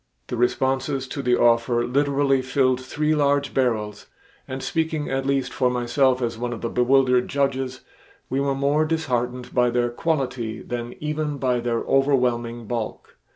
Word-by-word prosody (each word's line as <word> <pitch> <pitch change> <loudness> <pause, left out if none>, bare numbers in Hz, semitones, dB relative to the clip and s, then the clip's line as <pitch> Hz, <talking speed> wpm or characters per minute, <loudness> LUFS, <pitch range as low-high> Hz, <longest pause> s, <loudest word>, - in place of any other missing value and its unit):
The 125 - -2
responses 130 +2 0
to 140 - -4
the 125 -2 +2
offer 120 0 +3
literally 140 0 +2
filled 130 -1 +1
three 150 +4 -1
large 145 -1 +1
barrels 110 -5 -1 0.4
and 130 0 -5
speaking 160 -3 -1
at 135 0 -1
least 135 -2 0
for 125 -2 +2
myself 125 +1 +1
as 115 -1 -2
one 120 0 -2
of 115 - -7
the 115 - -2
bewildered 125 0 +3
judges, 135 -2 -1 0.5
we 135 - -1
were 140 0 0
more 140 +3 +2
disheartened 125 -6 -2
by 125 -1 +3
their 120 0 0
quality 125 -6 -2
than 120 0 -5
even 150 -1 -2
by 125 -2 +1
their 120 -1 -1
overwhelming 125 -4 +1
bulk. 115 -1 -5
130 Hz, 155 wpm, -23 LUFS, 120-140 Hz, 0.5 s, offer